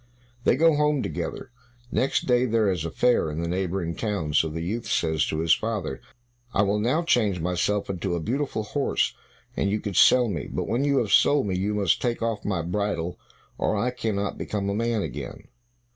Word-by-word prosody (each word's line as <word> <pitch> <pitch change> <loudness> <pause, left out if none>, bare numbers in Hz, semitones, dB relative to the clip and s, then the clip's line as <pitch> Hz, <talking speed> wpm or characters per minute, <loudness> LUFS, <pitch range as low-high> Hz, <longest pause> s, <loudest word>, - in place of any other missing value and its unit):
They - - +5
go 165 +3 +4
home 150 -2 +2
together. 130 - -5 0.4
Next 135 - +1
day 125 0 +3
there 110 -3 +2
is 85 -3 -2
a - - -2
fair 120 -4 +2
in 75 +1 -4
the 85 - -2
neighboring 90 -1 -2
town, 100 -9 -2
so 80 - +3
the 80 +2 -4
youth 115 +7 -3
says 80 -2 +1
to 80 - -2
his 80 -1 +4
father, 110 -11 -2 0.5
"I 100 - +4
will 100 +1 +1
now 130 +10 +1
change 105 - +2
myself 90 +4 0
into 95 -1 -2
a - - -1
beautiful 120 - -2
horse, 140 +6 0 0.4
and 100 - 0
you 105 +2 0
can 100 - -4
sell 125 +6 +6
me; 85 -8 -4
but - - -3
when 120 +4 0
you 140 -1 +2
have 110 -6 0
sold 145 -4 +5
me, 95 -2 -1
you 100 +3 -1
must 100 -5 +1
take 120 -2 -1
off 115 -2 -2
my 95 -5 -1
bridle, 90 -1 -2 0.4
or - - +1
I 125 +5 0
cannot 110 -5 -2
become 100 -2 -2
a - - 0
man 115 0 0
again." - - -7
105 Hz, 205 wpm, -25 LUFS, 90-120 Hz, 0.5 s, sell